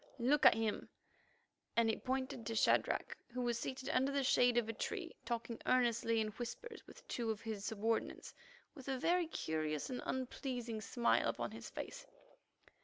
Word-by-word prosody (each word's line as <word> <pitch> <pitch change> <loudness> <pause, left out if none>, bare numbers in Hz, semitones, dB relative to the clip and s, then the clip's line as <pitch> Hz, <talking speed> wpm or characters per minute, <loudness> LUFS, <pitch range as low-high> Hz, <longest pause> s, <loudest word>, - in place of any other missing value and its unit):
"Look, 275 +4 +5
at - - +7
him," 220 -1 -1 0.9
and 230 -1 +5
he 220 - +2
pointed 260 -1 -2
to 225 - -2
Shadrach, - - +2 0.2
who 250 +1 -2
was 240 -1 0
seated 260 +2 -4
under 265 +2 +2
the 280 0 +1
shade 245 -1 +4
of 235 -2 +3
a 225 - -2
tree, - - -4
talking 235 -1 -3
earnestly 230 -2 +3
in 215 -1 +1
whispers 245 - -6
with - - -14
two 235 -2 -2
of 220 -2 -2
his 215 -3 -4
subordinates 220 +1 -1 0.4
with 270 -5 -11
a 265 -1 0
very 345 +5 +2
curious 155 - -2
and 250 - -3
unpleasing 245 -3 -3
smile 235 +3 +2
upon - - -2
his - - -8
face. - - -7
240 Hz, 170 wpm, -37 LUFS, 225-260 Hz, 0.9 s, at